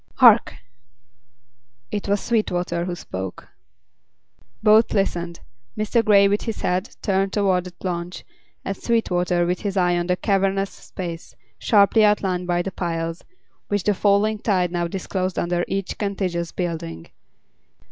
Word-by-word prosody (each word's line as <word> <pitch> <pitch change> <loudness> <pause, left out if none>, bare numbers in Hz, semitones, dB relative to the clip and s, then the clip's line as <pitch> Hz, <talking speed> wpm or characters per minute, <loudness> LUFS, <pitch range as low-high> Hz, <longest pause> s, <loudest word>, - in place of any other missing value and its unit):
"Hark!" - - +6 1.4
It 205 - -3
was 200 0 +2
Sweetwater 175 -6 -1
who 180 -1 -3
spoke. 95 - -7 1.1
Both 215 +1 +5
listened, 175 -4 -1 0.4
Mr. 215 +2 +1
Grey 200 -2 +6
with 205 +1 +1
his 225 -2 -4
head 180 +4 -1
turned 195 -1 +1
toward 190 -3 +2
the 180 - -9
launch 175 -1 -4 0.4
and 195 - -2
Sweetwater 180 -6 +1
with 180 +1 -1
his 200 -1 -3
eye 180 -1 +3
on 175 - -2
the 180 - +2
cavernous 195 -1 +1
space, 170 -3 -8 0.2
sharply 210 +1 +4
outlined 190 -4 +1
by 175 0 +1
the 195 - -4
piles, 165 -2 -3 0.4
which 205 -2 -1
the 210 - +2
falling 205 +2 +2
tide 185 -5 +1
now 175 -1 -1
disclosed 185 +1 -3
under 175 0 0
each 195 -1 -3
contiguous 185 -4 -2
building. 160 - -4
185 Hz, 135 wpm, -22 LUFS, 175-200 Hz, 1.4 s, Hark